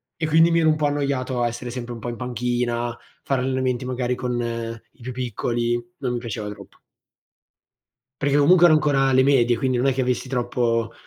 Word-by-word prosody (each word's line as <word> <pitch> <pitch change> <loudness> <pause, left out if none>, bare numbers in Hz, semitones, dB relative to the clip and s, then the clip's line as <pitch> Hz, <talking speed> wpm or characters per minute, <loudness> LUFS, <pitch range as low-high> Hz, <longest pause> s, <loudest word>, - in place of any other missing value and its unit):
E 160 - -2
quindi 165 +2 +5
mi 170 - +3
ero 160 -1 +4
un 155 - +3
po' 150 - 0
annoiato 140 -3 -1
a 120 - +2
essere 120 +1 -5
sempre 120 -1 -6
un 115 - -8
po' 120 - -5
in 120 - -5
panchina, 120 -1 -2 0.3
fare 135 -2 0
allenamenti 130 -1 -1
magari 125 -1 -1
con 125 -1 -2
i 115 0 -5
più 125 +2 -5
piccoli, 120 -1 -1 0.2
non 125 -3 -2
mi 120 - -2
piaceva 110 -3 -5
troppo. 100 -2 -12 1.4
Perché 140 0 +2
comunque 175 +5 +6
ero 155 - +6
ancora 145 -3 +2
alle 130 0 +4
medie, 125 -3 +3
quindi 130 +2 0
non 125 - +1
è 135 - +3
che 130 0 -1
avessi 125 +1 -1
troppo, 120 -2 0
125 Hz, 200 wpm, -23 LUFS, 120-135 Hz, 1.4 s, comunque